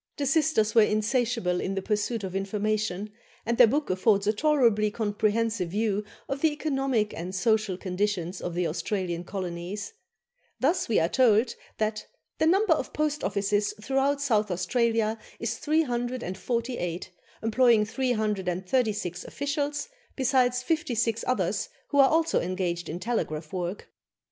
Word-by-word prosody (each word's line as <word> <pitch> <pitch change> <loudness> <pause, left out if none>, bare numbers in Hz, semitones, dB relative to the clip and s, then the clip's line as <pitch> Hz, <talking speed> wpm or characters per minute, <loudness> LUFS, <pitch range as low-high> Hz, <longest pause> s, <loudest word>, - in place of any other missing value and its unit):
The 285 - -1
sisters 275 -7 +2
were 230 - +7
insatiable 215 -3 +1
in 195 - -2
the 195 - -1
pursuit 210 +1 -1
of 190 -1 -5
information, 210 0 -1 0.3
and 235 +1 -1
their 245 - +9
book 285 0 0
affords 200 +2 +2
a 210 - +3
tolerably 235 -6 +3
comprehensive 215 -2 0
view 210 +1 0 0.2
of 275 0 -3
the 320 - +4
economic 270 -7 0
and 180 +3 -5
social 215 -1 +1
conditions 185 -1 -2
of 175 -1 -4
the 180 0 0
Australian 175 +1 -2
colonies. 185 +2 -5 0.7
Thus, 330 +5 +1
we 225 - +4
are 165 - +2
told 230 +1 +3 0.2
that 215 0 -2 0.3
"the 315 - +3
number 385 +1 +4
of 310 - -4
post 300 -1 -1
offices 205 +1 0
throughout 270 +5 +1
South 215 -7 +1
Australia 225 +3 +1 0.2
is 230 0 -3
348, 240 - -2 0.3
employing 225 -1 +4
336 210 -4 -1
officials, 290 +4 -2 0.3
besides 255 -1 +2
fifty 315 -3 -1
six 230 0 0
others, 200 -5 0 0.2
who 285 - +1
are 270 -1 +7
also 325 +1 +2
engaged 175 -1 -2
in 165 +3 -4
telegraph 160 -9 -3
work. 180 +1 -4
215 Hz, 140 wpm, -27 LUFS, 195-255 Hz, 0.7 s, their